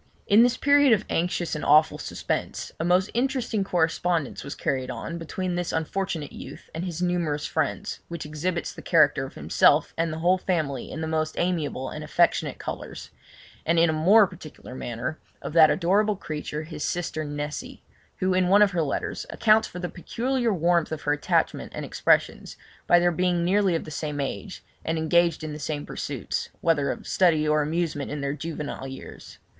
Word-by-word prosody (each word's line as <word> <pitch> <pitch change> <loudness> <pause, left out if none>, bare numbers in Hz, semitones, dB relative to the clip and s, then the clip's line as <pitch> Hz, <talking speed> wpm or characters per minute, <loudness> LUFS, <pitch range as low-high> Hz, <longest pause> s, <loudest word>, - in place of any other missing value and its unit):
In 205 +3 +6
this 245 +1 +4
period 285 -2 +5
of 215 -1 +1
anxious 175 0 -1
and 150 - -3
awful 155 +2 +4
suspense, - - -3
a - - -1
most 180 +3 +2
interesting 245 -4 0
correspondence 170 -3 0
was 140 - -6
carried 130 -1 -2
on 170 +5 -5
between 180 +2 -3
this 175 0 -2
unfortunate 160 -2 -2
youth - - -10
and 165 - -4
his 175 -1 -3
numerous 170 -5 0
friends, - - -2
which 170 -2 -6
exhibits 165 +4 -3
the - - -10
character 150 -5 +3
of - - -15
himself 75 +1 +3
and 165 0 0
the 155 - -4
whole 180 +3 +2
family 155 -9 -2
in 160 - -6
the 160 - -2
most 155 0 -1
amiable 160 -7 -1
and 155 - -6
affectionate 170 +3 +1
colours, - - -7 0.5
and 170 +1 +1
in 165 0 +5
a - - -2
more 195 +8 +6
particular 160 -8 -11
manner, 125 +4 -4 0.2
of - - -6
that 160 -2 +7
adorable 200 +4 +2
creature, 155 -3 -5
his 155 -1 -6
sister 170 -2 -2
Nessy, 145 0 -5 0.3
who, 185 0 +1
in 185 0 +2
one 200 +3 +6
of 200 - +3
her 175 -3 0
letters, 150 - -3
accounts 220 0 +3
for - - -10
the 180 0 -3
peculiar 240 +7 -1
warmth 170 -3 +2
of 155 -1 -4
her 145 - +2
attachment 145 - 0
and - - -4
expressions - - +1 0.3
by 175 - +6
their 175 0 +3
being 175 0 +1
nearly 190 -1 +3
of 165 - -2
the 155 - -9
same 150 -1 -4
age, 185 +8 -5 0.2
and 165 0 -1
engaged 170 0 +2
in 155 -1 -4
the 150 - -7
same 145 0 -3
pursuits, - - -4
whether 155 -4 +2
of - - -4
study 160 -5 +3
or 150 0 +3
amusement 155 -1 -2
in 145 -1 -4
their 140 0 -1
juvenile 150 -2 -5
years. 135 0 -10
165 Hz, 185 wpm, -25 LUFS, 150-180 Hz, 0.5 s, that